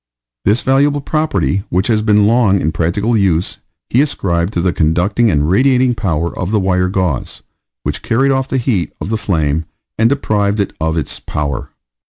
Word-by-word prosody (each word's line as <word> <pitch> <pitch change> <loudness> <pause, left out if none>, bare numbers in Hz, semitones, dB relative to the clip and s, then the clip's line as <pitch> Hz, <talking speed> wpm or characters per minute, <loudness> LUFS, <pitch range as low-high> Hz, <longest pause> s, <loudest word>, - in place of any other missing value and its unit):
This 105 +5 +2
valuable 140 +2 +2
property, 155 -9 0
which 90 +2 0
has 110 -2 +1
been 105 -1 +3
long 110 -3 +3
in 80 - 0
practical 95 +9 0
use, 95 -5 0 0.3
he 125 - +4
ascribed 90 - -1
to - - -1
the 90 0 +1
conducting 90 +9 +1
and 75 -4 +1
radiating 130 +6 +3
power 85 -7 -2
of 90 - -3
the 105 0 +1
wire 90 -1 +1
gauze, 90 -8 -2 0.4
which - - -3
carried 135 +4 +1
off 135 0 0
the 135 - -1
heat 115 - -1
of - - -5
the 110 - 0
flame, 80 -7 -1 0.3
and 115 +1 +4
deprived 105 -6 0
it 100 - -1
of 80 +1 0
its 75 -4 -3
power. 75 -2 -4
100 Hz, 180 wpm, -16 LUFS, 85-120 Hz, 0.4 s, he